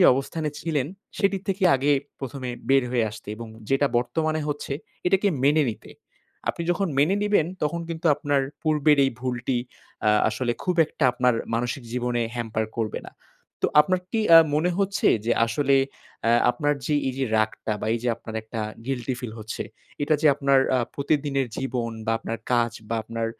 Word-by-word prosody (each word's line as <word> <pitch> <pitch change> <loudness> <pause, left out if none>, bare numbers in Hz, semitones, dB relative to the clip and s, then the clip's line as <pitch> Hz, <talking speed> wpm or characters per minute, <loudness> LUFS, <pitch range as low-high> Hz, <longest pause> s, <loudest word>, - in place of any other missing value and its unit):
যে 180 - +7
অবস্থানে 150 +4 -2
ছিলেন, 150 -5 -1 0.3
সেটির 195 -2 +1
থেকে 195 0 0
আগে 140 +2 +2 0.3
১মে 130 -1 -5 0.2
বের 135 -1 +5
হয়ে 120 -3 +2
আসতে 110 -1 -12
এবং 115 -1 -8 0.2
যেটা 135 +1 +3
বর্তমানে 155 +5 -1
হচ্ছে, 145 -1 -3 0.3
এটাকে 195 +2 +3 0.2
মেনে 150 +2 +5
নিতে। - - -11 0.6
আপনি 170 - -1
যখন 195 +2 0
মেনে 160 +7 +4
নিবেন, 205 -6 +3 0.2
তখন 165 +3 0
কিন্তু 165 0 -3
আপনার 145 -2 0 0.2
পূর্বের 150 -1 +3
এই 135 - +2
ভুলটি 125 0 -1 0.5
আ - - +6 0.2
আসলে 120 -2 -1
খুব 180 -1 0
একটা 155 - -3
আপনার 125 -1 +2 0.2
মানসিক 120 +3 -2
জীবনে 120 -1 0
hamper 110 -2 -1
করবে 110 -2 -2
না। - - -11 0.5
তো - - +4
আপনার 185 +4 +2
কি 225 - 0 0.2
আ - - +12 0.2
মনে 170 +4 +2
হচ্ছে 200 0 +2 0.2
যে 120 - +3
আসলে 140 +3 +2 0.5
অ্যা 115 - +4 0.2
আপনার 145 +3 0
যে 150 - +1
এই - - -1
যে 135 - +1
রাগটা 110 0 0
বা - - -3
এই 115 - -1
যে 125 - 0
আপনার 110 -1 -9
একটা 110 0 -6 0.3
guilty 130 -1 -2
ফিল 120 -3 -5
হচ্ছে, 110 0 -5 0.4
এটা 155 +2 +2
যে 155 - +3
আপনার 140 -1 +3 0.2
আ - - +2 0.2
প্রতিদিনের 140 -2 0
জীবন 125 -3 -2 0.2
বা 115 - +2
আপনার 115 - -5
কাজ 120 -1 +3 0.2
বা 115 - -1
আপনার 115 0 -3
135 Hz, 180 wpm, -25 LUFS, 120-155 Hz, 0.6 s, আ